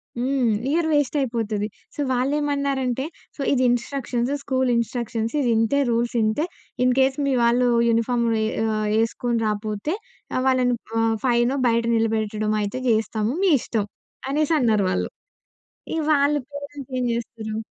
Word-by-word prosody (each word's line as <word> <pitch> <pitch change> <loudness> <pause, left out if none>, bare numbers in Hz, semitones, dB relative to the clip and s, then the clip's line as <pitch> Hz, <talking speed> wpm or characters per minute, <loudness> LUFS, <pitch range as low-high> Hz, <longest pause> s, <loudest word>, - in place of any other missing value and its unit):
హ్మ్. 250 -1 +1 0.2
Year 320 +2 +1
west 290 -1 +1
అయిపోతది. 220 -4 -1 0.3
So - - -13
వాళ్ళేమన్నారంటే 275 -1 0 0.3
"so - - -7
ఇది 255 - +2
ఇన్‌స్ట్రక్షన్స్, 245 0 -1
స్కూల్ 260 -1 0
ఇన్‌స్ట్రక్షన్స్ 230 -1 -2
ఇది 250 -4 +1
ఇంతే. 225 +6 +2
రూల్స్ 235 +1 0
ఇంతే. 220 +10 +1 0.4
ఇన్‌కేస్ 265 +2 +3
మీ 275 - +1
వాళ్ళు 245 +1 +3 0.2
యూనిఫార్మ్ 235 +1 +1 0.2
యే 220 - +1 0.3
ఆహ్, 215 0 -1
ఎసుకొని 235 +1 -1
రాకపోతే 215 - -2 0.4
ఆహ్, 255 - +1
వాళ్ళని 255 -2 +3 0.3
ఆహ్, 225 0 +2
ఫైనో 245 +2 +2
బయట 235 0 +2
నిలబెట్టడం 215 -1 0
అయితే 205 +5 -3
జేస్తాము, 220 0 +1
మీ 385 - +4
ఇష్టం." 215 -3 -1 0.4
అనేసి 305 +3 +1
అన్నారు 215 -5 +2
వాళ్ళు. - - -1 0.9
ఇగ 325 - 0
వాళ్ళ 285 +1 +3
పేరెంట్స్ 285 -2 -8
ఏం 250 - 0
చేస్తారు? 225 -2 -5
245 Hz, 140 wpm, -23 LUFS, 225-270 Hz, 0.9 s, మీ